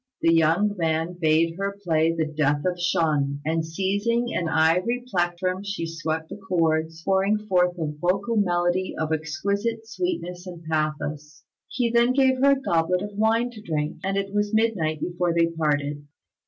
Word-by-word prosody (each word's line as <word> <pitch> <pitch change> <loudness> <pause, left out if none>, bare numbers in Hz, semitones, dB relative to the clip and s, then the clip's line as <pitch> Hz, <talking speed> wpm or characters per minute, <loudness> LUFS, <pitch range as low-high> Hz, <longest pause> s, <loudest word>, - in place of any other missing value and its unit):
The 165 - +5
young 165 +6 +3
man 165 0 0
bade 165 +1 +2
her 200 0 -2
play 160 -2 +2
the 165 -1 -1
Death 150 -1 0
of 180 -1 -1
Shun; 150 -5 +1
and 160 +1 0
seizing 205 +8 -1
an 170 - -1
ivory 180 +10 +2
plectrum 185 -1 -1
she 200 -4 -3
swept 160 -1 -3
the - - -7
chords, 165 -4 0
pouring 195 +2 +2
forth 180 -4 +1
a 165 - -2
vocal 180 +9 -1
melody 180 -2 +1
of 160 0 -1
exquisite 200 +9 -2
sweetness 210 - -4
and 175 -2 -9
pathos. 155 -1 -3 0.2
He 240 -2 -1
then 240 +1 +4
gave 260 -1 +3
her 280 +1 +5
a 275 - -1
goblet 180 -5 +1
of 205 0 -7
wine 225 +3 +2
to 220 -3 -11
drink, 155 -5 -2
and 195 +1 -1
it 195 0 -2
was 205 +1 0
midnight 185 -9 +1
before 175 -1 -1
they 170 0 +4
parted. 150 -3 -1
175 Hz, 170 wpm, -24 LUFS, 160-205 Hz, 0.2 s, The